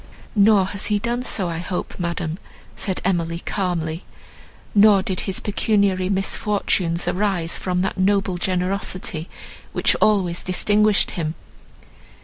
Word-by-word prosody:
"Nor 205 -2 +5
has 200 - -2
he 210 - +2
done 235 +4 -2
so, 200 -7 0
I 165 -1 -3
hope, 180 +1 -4
madam," 170 -1 -3 0.4
said 190 -3 -3
Emily 170 -3 0
calmly, 170 -4 -2 0.7
"nor 205 -2 +6
did 190 -4 -2
his 190 - 0
pecuniary 200 -3 +1
misfortunes 195 -3 0
arise 185 -4 0
from 180 -1 -1
that 190 0 -2
noble 195 -2 +1
generosity, 185 -2 -2 0.4
which - - +3
always 185 -5 +2
distinguished 205 +3 +2
him. 160 -2 -3
190 Hz, 125 wpm, -22 LUFS, 175-205 Hz, 0.7 s, nor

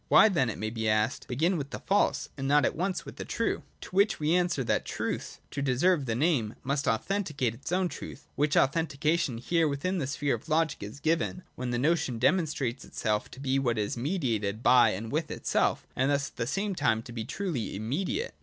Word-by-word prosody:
Why 220 - +7
then, 150 - +2
it 110 - -4
may 110 +2 -3
be 110 -1 -1
asked, 110 +3 +1
begin 165 +9 +1
with 140 -2 -4
the - - -5
false 200 - +1
and 135 -1 -3
not 145 +1 +4
at - - 0
once 185 +3 -2
with - - -10
the - - -4
true? - - -1 0.2
To - - -9
which 200 +1 +3
we 155 +2 +2
answer 175 -6 +2
that - - +1
truth, - - -4
to 140 - -3
deserve 140 +3 +2
the 115 - 0
name, 125 -6 +1
must 140 +1 -1
authenticate 140 - 0
its 135 +8 -8
own 185 0 +2
truth: - - -9
which 145 0 +2
authentication, 150 -2 +1
here 165 +6 +1
within 165 +6 -1
the 135 - -1
sphere 140 +1 0
of 120 +7 -5
logic, 160 -1 +1
is 105 +7 -7
given, 165 +4 0
when 125 0 -4
the 120 - 0
notion 150 -2 +1
demonstrates 135 -2 +1
itself 105 -1 -2
to 130 - -12
be 135 0 +1
what 120 -4 0
is 105 -1 -1
mediated 120 - -1
by 120 -3 +6
and 110 +3 -4
with 155 +2 -1
itself, - - 0
and 130 +2 +2
thus 140 -1 0
at - - -35
the 115 - -1
same 195 +8 -1
time 115 -9 +1
to 120 - -10
be 115 -2 -4
truly 155 - -3
immediate. 155 - -2
140 Hz, 215 wpm, -29 LUFS, 120-165 Hz, 0.2 s, Why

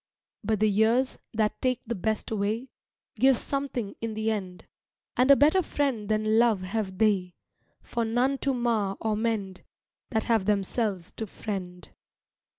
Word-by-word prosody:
But 215 0 0
the 215 - +4
years, 225 +5 +2 0.2
that 215 -1 0
take 255 -1 0
the 235 - -3
best 220 +2 -2
away, 220 +4 -1 0.5
Give 260 +2 +5
something 270 -7 -3
in 225 -1 -3
the 220 +1 0
end; 185 -4 -5 0.5
And 255 +2 +3
a 280 - +10
better 305 +7 +4
friend 270 - -1
than 215 +1 +2
love 230 -5 +3
have 190 -1 -3
they, 190 -4 +1 0.5
For 235 - -2
none 245 +4 +1
to 275 - +1
mar 230 -6 0
or 220 -1 0
mend, 210 -4 -2 0.5
That 220 -1 0
have 225 -5 +1
themselves 200 -2 0
to 220 - -3
friend. 180 -3 -6
220 Hz, 155 wpm, -27 LUFS, 200-240 Hz, 0.5 s, a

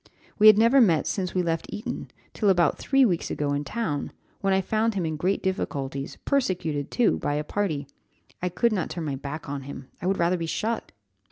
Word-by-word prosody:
We 215 - +8
had 215 -1 +9
never 235 +5 +6
met 170 -9 +4
since 185 -3 -2
we 180 - +2
left 165 -1 -1
Eton, 210 - -5 0.2
till 210 - +1
about 175 -3 +3
three 270 -1 +4
weeks 175 -7 0
ago 145 -1 -1
in 145 +1 -1
town, 150 -6 -3 0.3
when 195 - 0
I 190 - +4
found 220 +3 0
him 185 -4 0
in 160 -1 -2
great 185 +6 0
difficulties, 140 -8 -3
persecuted 180 - 0
too, 240 -3 +2
by 145 - -1
a 150 - -1
party 155 -5 -2 0.6
I 180 - 0
could 230 +6 +1
not 185 -5 -1
turn 170 -3 -4
my 140 -2 -2
back 145 +3 -6
on 140 0 -4
him 135 -1 -9
I 180 - -2
would 195 +1 +1
rather 175 +2 +2
be 165 -1 -3
shot!" 225 +7 -2
180 Hz, 210 wpm, -26 LUFS, 150-210 Hz, 0.6 s, had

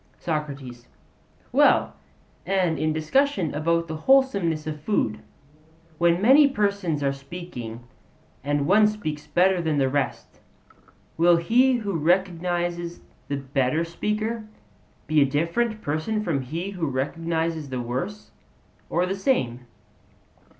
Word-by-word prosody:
SOCRATES: 140 -6 -5 0.6
Well, - - +4 0.5
and 180 -3 0
in 155 - +1
discussions 175 - +1
about 165 +3 0
the 160 -1 -5
wholesomeness 195 - +2
of 150 -1 -5
food, 150 - 0 0.8
when 170 0 +3
many 270 +8 +6
persons 200 - -1
are 140 0 +1
speaking, 135 -6 -8 0.6
and 145 0 0
one 210 +6 +5
speaks 155 -9 -4
better 185 0 +3
than 160 -3 0
the 135 -1 +2
rest, 140 -1 -3 0.8
will 170 +1 +5
he 245 +10 +3
who 215 -5 -2
recognizes 175 0 0 0.3
the 140 - -2
better 135 +3 0
speaker 215 +6 -3 0.6
be 155 0 +3
a - - +8
different 170 - -1
person 155 +9 -1
from 155 -8 -1
him 165 +9 -4
who 175 -5 -3
recognizes 160 +3 -2
the 130 -1 -3
worse, 130 - -4 0.6
or 175 - +1
the 185 - -2
same? 130 - -1
165 Hz, 120 wpm, -24 LUFS, 145-195 Hz, 0.8 s, a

